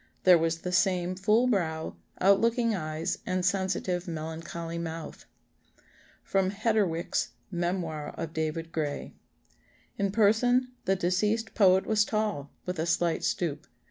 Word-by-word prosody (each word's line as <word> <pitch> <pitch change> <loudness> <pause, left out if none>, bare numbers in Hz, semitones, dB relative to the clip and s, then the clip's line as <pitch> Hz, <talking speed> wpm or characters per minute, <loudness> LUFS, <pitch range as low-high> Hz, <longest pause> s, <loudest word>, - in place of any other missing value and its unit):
There 180 -2 +7
was 165 0 0
the 180 - -3
same 185 -1 +2
full 210 +6 +3
brow, 165 -9 -1 0.2
out 195 +1 +5
looking 230 0 +2
eyes, 155 -3 -2
and 185 -1 -1
sensitive 190 -2 0
melancholy 165 +1 -5
mouth." 165 -1 -6 1.0
[Sidenote: 190 0 +1
Hedderwick's 205 -6 0 0.2
Memoir 170 -4 -2
of 160 -1 -5
David 160 +1 -3
Gray.] 150 -3 -3 0.9
"In 200 -1 +1
person, 230 +4 +3 0.2
the 195 - +3
deceased 210 +5 0
poet 190 -2 +5
was 215 -1 +3
tall, 210 -10 -2 0.2
with 180 -2 -3
a 160 - 0
slight 170 -1 +1
stoop. 155 -3 -1
180 Hz, 130 wpm, -28 LUFS, 165-200 Hz, 1.0 s, There